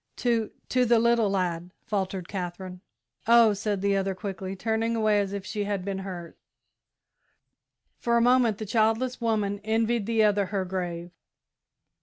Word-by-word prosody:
"To 230 -3 0 0.2
to 255 0 +3
the 240 -1 +4
little 235 -2 +3
lad," 180 -3 -1 0.2
faltered 190 -4 -2
Katherine. 180 -1 -6 0.5
"Oh," 230 -2 +6
said 205 -1 -2
the 200 0 +2
other, 195 -1 -1
quickly, 190 -1 -5
turning 225 +3 -1
away 215 -2 +2
as 200 -1 -1
if 200 -1 -5
she 210 -1 -3
had 200 -2 -3
been 195 -1 -3
hurt. 180 -3 -8 1.6
For 235 0 +1
a - - +4
moment 245 -3 +3
the 215 - -5
childless 225 +4 +1
woman 210 -3 0
envied 225 0 0
the 225 -1 +3
other 205 -2 +2
her 195 -1 -2
grave. 175 -2 -4
205 Hz, 155 wpm, -26 LUFS, 190-225 Hz, 1.6 s, Oh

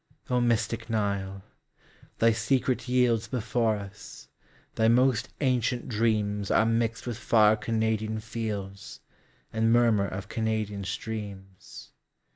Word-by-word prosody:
O 125 0 +3
mystic 115 -1 0
Nile! 100 -3 -2 0.7
Thy 115 0 +4
secret 125 +3 +1
yieldsBefore 120 -2 +1
us; 100 +1 -11 0.4
thy 110 - +2
most 125 0 +3
ancient 125 -2 0
dreamsAre 105 -2 +1
mixed 115 0 0
with 120 -2 -4
far 110 -2 +4
Canadian 110 0 -1
fieldsAnd 105 -3 -5 0.6
murmur 115 -3 +4
of 95 +3 -6
Canadian 110 -2 -2
streams. 100 -2 -7
110 Hz, 95 wpm, -27 LUFS, 105-115 Hz, 0.7 s, Thy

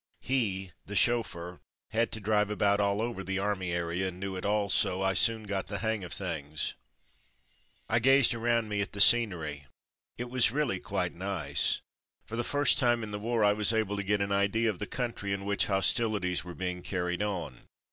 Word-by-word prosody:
He, 100 -8 -1 0.2
the 105 - -6
chauffeur, 90 -9 0 0.3
had 115 +1 0
to 110 - -3
drive 105 0 +1
about 100 -1 +1
all 100 +1 +1
over 115 -5 -4
the 95 +1 -3
army 95 -2 -2
area 85 +2 -2
and 90 -1 -7
knew 95 0 -4
it 95 - -4
all 105 0 +1
so 95 -1 +2
I 95 0 +2
soon 110 +4 +2
got 100 -2 -3
the - - -4
hang 110 -3 -2
of 90 - -8
things. 80 -5 -2 1.1
I 115 - +2
gazed 135 +1 +5
around 115 -1 0
me 105 -1 -2
at 100 - -5
the 100 - -7
scenery; 85 - +4 0.5
it 120 - -4
was 125 -4 +5
really 140 -8 -1
quite - - -2
nice. 95 0 0 0.4
For 115 - -7
the 120 - -1
first 145 0 +3
time 120 -3 +2
in 105 - -6
the 105 - -4
war 115 +1 0
I 105 0 +4
was 105 0 +5
able 110 -3 0
to 100 - -2
get 100 +1 0
an 100 0 -1
idea 100 +3 +1
of 95 - -11
the 105 - -4
country 115 -6 -3
in 100 0 -4
which 100 0 +1
hostilities 100 -2 +1
were 90 -1 -9
being 90 -1 -4
carried 90 0 -3
on. 90 -11 -4
100 Hz, 200 wpm, -29 LUFS, 95-115 Hz, 1.1 s, gazed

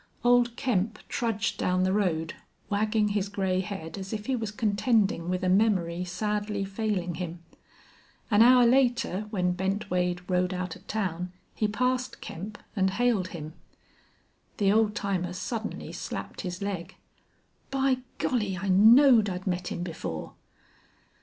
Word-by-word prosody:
Old 245 -1 +4
Kemp 220 -5 0
trudged 220 -4 -1
down 185 0 +1
the 185 0 +2
road, 170 -6 0 0.4
wagging 210 +1 +2
his 205 -1 -1
gray 190 -2 0
head 190 -2 -5
as 190 0 -7
if 210 -2 -4
he 265 - 0
was 225 -3 -3
contending 210 -3 +1
with 185 0 -1
a - - +1
memory 185 -3 +2
sadly 205 +2 -2
failing 195 -3 -2
him. 170 -1 -6 0.9
An 210 0 +5
hour 250 +1 +7
later 240 -5 +2
when 180 -4 0
Bent 190 +2 -2
Wade 180 0 0
rode 180 0 +1
out 180 -2 -4
of - - -17
town 180 -4 -2 0.2
he 215 - 0
passed 255 +3 -1
Kemp, 210 +5 -7 0.2
and 190 -2 +2
hailed 215 -2 +1
him. 155 -3 -7 1.0
The 200 -2 +3
old 215 0 +3
timer 185 -5 -2
suddenly 215 +5 -4
slapped - - -6
his 180 0 -5
leg: 190 -3 -4 0.7
"By 270 -1 +2 0.2
Golly! 210 -7 0
I 195 +1 -3
knowed 225 +3 +7
I'd 180 0 -5
met 180 -2 -1
him 175 - -3
before!" 160 - -5
200 Hz, 145 wpm, -28 LUFS, 180-220 Hz, 1.0 s, hour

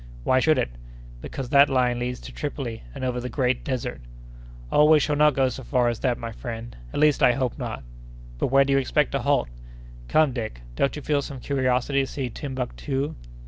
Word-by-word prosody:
"Why 130 - +3
should 155 +3 +3
it?" - - 0 0.5
"Because 130 - -6
that 140 0 +6
line 125 -2 +2
leads 125 0 -3
to - - -9
Tripoli, 135 -6 -5
and - - -6
over 125 -1 -1
the 125 +1 -4
Great 125 -1 0
Desert." 125 - -3 0.7
"Oh, 150 - +5
we 155 0 +6
shall 150 0 0
not 150 -1 +4
go 135 -1 +3
so 130 - -7
far 125 -1 +1
as 120 - -3
that, 125 -3 0
my 115 0 -6
friend—at 115 - -7
least, 150 -2 +4
I 125 - +6
hope 130 +1 -2
not." 115 - -5 0.6
"But - - +1
where 135 +1 +5
do 140 - +1
you 135 - +4
expect 130 - +1
to - - 0
halt?" 65 - +1 0.6
"Come, 155 - +3
Dick, 110 - -5
don't 140 - +1
you 150 - -7
feel 145 -2 +1
some 140 -1 -7
curiosity 130 0 +1
to 135 - -2
see 130 -3 -4
Timbuctoo?" 135 +2 -3
130 Hz, 205 wpm, -25 LUFS, 120-140 Hz, 0.7 s, that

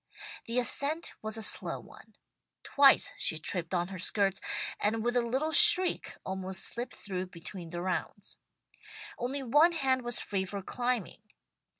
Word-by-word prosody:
The 230 +2 -3
ascent 280 +6 0
was 215 +1 -3
a 220 - -4
slow - - -2
one. - - -17 0.5
Twice 280 -1 +4
she 160 - -2
tripped 170 +2 -4
on 175 +1 -2
her 190 -1 -8
skirts, 195 +1 +1 0.4
and 220 +1 -1
with 240 +1 -1
a 245 - +3
little 265 +7 -2
shriek 370 -1 +7
almost 190 0 -3
slipped 240 +2 -5
through 185 -2 -6
between 175 0 -8
the 175 +1 -6
rounds. 185 0 -5 0.8
Only 270 +3 -4
one 295 +8 +3
hand 265 -5 0
was 240 -1 -1
free 195 -2 -2
for 195 +1 -7
climbing. 245 -2 -3
225 Hz, 155 wpm, -29 LUFS, 190-260 Hz, 0.8 s, shriek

